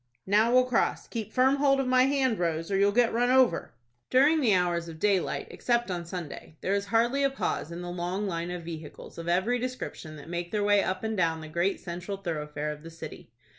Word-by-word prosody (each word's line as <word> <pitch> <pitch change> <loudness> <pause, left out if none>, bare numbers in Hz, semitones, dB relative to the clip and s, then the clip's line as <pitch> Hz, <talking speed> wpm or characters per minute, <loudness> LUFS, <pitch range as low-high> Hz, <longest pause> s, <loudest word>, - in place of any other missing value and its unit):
"Now 215 +4 +3
we'll 255 0 +5
cross. 250 -2 0
Keep 220 -2 -5
firm 265 +2 +3
hold 275 -1 +3
of 270 - +1
my 255 0 +4
hand 265 -5 +1
Rose, 165 +1 -1
or - - +1
you'll 200 +1 +4
get 240 +2 +3
run 245 +2 +2
over." 255 - +3 0.3
During 295 +5 +4
the 220 -7 +4
hours 175 -2 0
of 165 -1 -8
daylight, 195 -2 0
except 240 -4 0
on 175 -2 -4
Sunday, 170 -2 -7
there 195 - 0
is 200 0 0
hardly 235 +6 +2
a 275 - +3
pause 270 - -3
in 170 +1 -6
the 175 - -5
long 180 +3 -2
line 170 -2 -3
of 180 -1 -5
vehicles 160 -1 -9
of 165 - -7
every 190 +8 +1
description 250 -10 -5
that 150 - -11
make 175 0 -4
their 210 +1 -1
way 205 -1 +4
up 185 +2 -2
and 220 0 -1
down 165 -4 +1
the 155 - -8
great 170 +5 0
central 180 +3 -5
thoroughfare 150 -5 -4
of 150 0 -8
the 165 - -10
city. 165 0 -10
195 Hz, 225 wpm, -28 LUFS, 170-240 Hz, 0.3 s, we'll